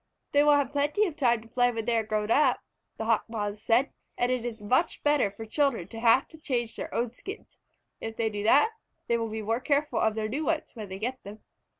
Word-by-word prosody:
"They 285 - +5
will 295 0 +6
have 285 -1 +1
plenty 290 +9 +1
of 340 -7 -4
time 240 -7 +2
to - - -16
play 245 +1 +2
when 225 -2 -4
they 235 - +1
are 225 - +2
grown 215 0 -1
up," 300 - +4 0.4
the 220 - -3
Hawk 225 -1 +2
Moths 210 -2 -3
said, 235 +5 +2 0.3
"and 245 +1 +1
it 250 -2 -1
is 235 -2 -5
much 250 +11 0
better 290 -8 +3
for 205 +3 -9
children 230 - 0
to 225 - -8
have 235 +3 +4
to 320 - -14
change 240 -6 -2
their - - -6
own 235 0 -1
skins. 395 - -10 0.4
If 225 0 -6
they 225 -1 0
do 205 -1 -4
that, 280 - +5 0.3
they 235 0 +1
will 225 -1 -2
be 220 0 -4
more 225 +3 0
careful 285 +2 0
of 220 -1 +2
their 215 -1 -1
new 275 +8 -2
ones, 325 -1 -1
when 215 -4 -8
they 190 - -6
get 250 +5 -4
them." 210 +2 -11
235 Hz, 245 wpm, -28 LUFS, 220-280 Hz, 0.4 s, will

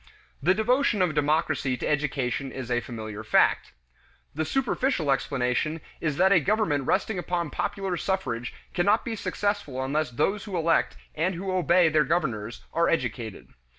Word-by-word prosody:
The 180 +6 +3
devotion 235 +1 +2
of 175 -4 +1
democracy 150 -3 +1
to - - -4
education 135 -2 -1
is 130 -2 -6
a 120 - +2
familiar 110 -3 -7
fact. 105 - +3 0.6
The 160 +2 -1
superficial 255 - 0
explanation 135 +3 0 0.2
is 150 -3 -1
that 190 +2 +4
a 190 - +7
government 165 -7 +1
resting 215 -4 +1
upon 175 -3 -2
popular 195 -2 -2
suffrage 125 -13 -2 0.2
cannot 200 +5 +2
be 230 - -2
successful 205 -11 -2
unless 145 +2 0
those 175 - -1
who 195 -4 -3
elect 165 0 +1 0.2
and 170 +4 0
who 190 +2 -3
obey 180 -1 +4
their 155 -1 +3
governors 125 -9 -2
are 170 +1 +2
educated. 120 - -2
155 Hz, 150 wpm, -26 LUFS, 130-190 Hz, 0.6 s, a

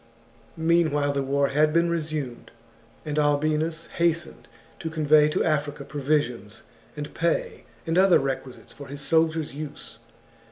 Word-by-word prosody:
CHAP. 115 +1 -30
Meanwhile 160 -3 +2
the 140 - 0
war 140 +1 +1
had 150 +2 +3
been 170 +2 +3
resumed, 155 -7 -3 0.6
and 150 0 -1
Albinus 155 +2 +1
XXXVI. - - -15
hastened 170 -1 -1 0.3
to 160 - -4
convey 155 -1 +4
to - - 0
Africa 150 -3 -1
provisions, 135 -7 -2 0.3
and 150 0 -6
pay, 170 0 -1 0.2
and 165 +2 +2
other 190 -1 +6
requisites 135 -1 -5
for 140 - -10
his 140 +1 -7
soldiers' 160 0 +1
use. 150 0 -8
150 Hz, 145 wpm, -25 LUFS, 140-160 Hz, 0.6 s, other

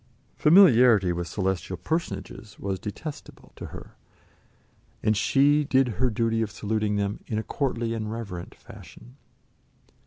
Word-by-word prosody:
Familiarity 125 - +6
with 85 0 -4
celestial 95 -1 -2
personages 115 - -5
was 95 -1 -4
detestable 145 +8 -8
to - - -8
her, - - -11 1.1
and 110 0 +2
she 145 +8 +3
did 135 -2 +2
her 120 +4 0
duty 115 0 0
of 110 - -1
saluting 105 0 -2
them 100 0 -2
in 110 - -2
a 110 - -2
courtly 120 -4 -2
and 110 -1 -4
reverent 100 -7 -7
fashion. - - -15
110 Hz, 130 wpm, -26 LUFS, 100-125 Hz, 1.1 s, Familiarity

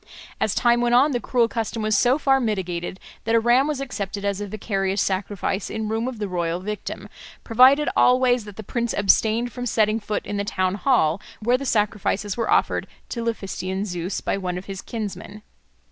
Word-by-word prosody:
As 210 - 0
time 240 0 +3
went 240 0 +3
on, 275 +4 +5
the 245 - 0
cruel 235 +1 +2
custom 225 -1 -3
was 215 -1 +2
so 245 +5 +4
far 270 -3 +3
mitigated 185 -6 -3 0.3
that 225 +1 +2
a - - +6
ram 240 +4 +3
was 300 -3 -2
accepted 205 -7 -4
as 200 0 -1
a 205 - -4
vicarious 195 -1 -2
sacrifice 195 0 -1
in 220 0 -3
room 225 +2 -1
of 260 -3 -5
the 210 -1 -3
royal 175 -2 -2
victim, 210 +3 -5 0.4
provided 260 +6 +5
always 250 -2 +4
that 205 -2 -10
the 220 - -8
prince 235 +2 -2
abstained 220 +4 +2
from 245 -1 -4
setting 215 -1 +2
foot 210 -1 -3
in 205 - -3
the 200 - 0
town 185 -2 0
hall 200 - +2 0.2
where 240 +3 +2
the 275 +1 -3
sacrifices 210 -2 0
were 230 - -2
offered - - +2 0.2
to 235 - -4
Laphystian 195 -4 -3
Zeus 180 0 -3
by - - -1
one 180 -2 -3
of 180 - -7
his 195 -1 -6
kinsmen. 210 -1 -6
215 Hz, 195 wpm, -23 LUFS, 195-240 Hz, 0.4 s, a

